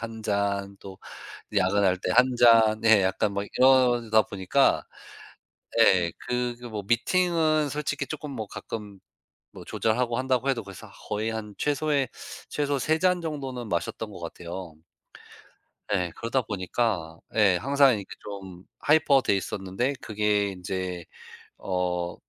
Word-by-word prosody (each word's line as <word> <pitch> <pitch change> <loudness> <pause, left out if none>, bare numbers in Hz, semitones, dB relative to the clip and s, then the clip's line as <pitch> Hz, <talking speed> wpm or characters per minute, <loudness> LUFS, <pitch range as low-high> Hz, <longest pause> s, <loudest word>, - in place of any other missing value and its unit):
1 115 -1 -7
잔, 100 -1 -1
또 95 -1 -11 0.6
야근할 95 -1 +3
때 90 - -1
1 125 +4 +6
잔 115 -2 +5
예 110 -3 +6
약간 100 +2 0
뭐 100 0 -2
이러다 120 -4 +4
보니까. 95 -2 +1 1.0
예. 85 -3 +4
그, 125 -1 -2
그 120 - -9
뭐 110 -3 -5
미팅은 155 - +2
솔직히 150 -1 -3
쪼끔 150 -2 -6
뭐 110 -5 -5
가끔 105 -1 -8 0.5
뭐 - - -12
조절하고 115 +1 0
한다고 130 +1 0
해도 130 -4 0
벌써 100 -2 -11 0.2
거의 110 +2 -1
한 105 -2 -6
최소의 145 -2 0 0.4
최소 145 -1 -1
3 155 +4 +1
잔 180 0 +2
정도는 135 -7 -5
마셨던 105 +5 -3
것 95 - -10
같아요. 85 0 -7 1.2
예. 90 -3 -1
그러다 120 +3 -1
보니까 95 -5 -2 0.2
예 100 -5 +4
항상 140 +3 +4
이렇게 100 -2 -5 0.2
좀 95 -3 -9 0.2
하이퍼 145 -3 +4
돼 - - +2
있었는데 95 +7 -2
그게 105 -1 0
인제 90 -2 -5 0.6
어 90 -2 -2
110 Hz, 240 characters per minute, -26 LUFS, 95-130 Hz, 1.2 s, 1